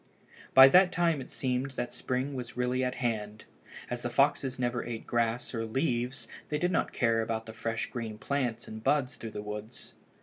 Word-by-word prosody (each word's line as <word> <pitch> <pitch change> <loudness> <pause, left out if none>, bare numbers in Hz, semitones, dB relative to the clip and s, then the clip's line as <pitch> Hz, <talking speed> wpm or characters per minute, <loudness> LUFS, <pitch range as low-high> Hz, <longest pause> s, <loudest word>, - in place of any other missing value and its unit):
By 130 0 +11
that 180 +3 +6
time 170 -5 +1
it 130 - -9
seemed 130 +1 -1
that 120 - -3
spring 130 +3 -2
was 125 -3 -6
really 125 +1 +1
at 125 0 -1
hand. 110 -3 -3 0.4
As 125 -1 -4
the 120 - -2
foxes 135 0 +2
never 120 -1 -1
ate 115 -2 -6
grass 115 +1 0
or 115 -2 -2
leaves 125 +1 -1 0.2
they 150 - 0
did 180 +4 +1
not 165 - +1
care 115 -2 +2
about 110 0 -2
the 110 - -8
fresh 115 0 -2
green 115 -4 -5
plants 125 -2 -2
and 110 0 -8
buds 140 -2 +2
through 115 - -7
the 105 -1 -6
woods. 105 +2 -7
120 Hz, 195 wpm, -30 LUFS, 115-130 Hz, 0.4 s, By